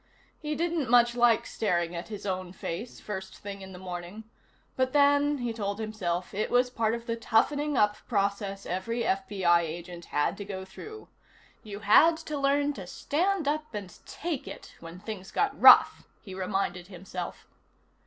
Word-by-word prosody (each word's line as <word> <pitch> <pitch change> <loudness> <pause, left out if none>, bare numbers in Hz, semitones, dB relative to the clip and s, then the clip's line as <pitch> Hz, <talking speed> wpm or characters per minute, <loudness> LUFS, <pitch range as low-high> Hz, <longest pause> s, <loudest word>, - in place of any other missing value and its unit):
He 305 -1 -3
didn't 330 -3 -1
much 240 0 +5
like 240 -2 +3
staring 175 -5 -1
at 170 - -5
his 210 -2 -7
own 185 -2 -3
face, 190 +6 -6
first 190 -2 -7
thing 200 -1 -8
in 190 0 -9
the 180 - -9
morning, 180 +3 -7 0.5
but 260 0 0
then, 285 0 +4
he 240 -3 -3
told 200 -2 -3
himself, 195 -5 -3
it 210 +2 -1
was 250 0 +3
part 230 -2 0
of 235 0 -8
the 230 -1 -2
toughening 285 +6 +1
up 210 0 +3
process 200 -2 -1
every 230 +7 -2
FBI 190 -4 +2
agent 170 +1 -6
had 150 +6 0
to 205 - -5
go 190 -2 -6
through. 430 - -10 0.5
You 210 -3 -8
had 315 +11 +6
to 305 -3 -5
learn 285 +1 +2
to 190 -8 -8
stand 345 - -1
up 305 -3 -2
and 195 -4 -6
take 325 -5 -4
it - - -9
when 165 +2 -10
things 195 -2 -7
got 415 -1 -1
rough, - - +8 0.2
he 190 - -10
reminded 185 -1 -2
himself. 180 -1 -7
210 Hz, 170 wpm, -28 LUFS, 185-260 Hz, 0.5 s, rough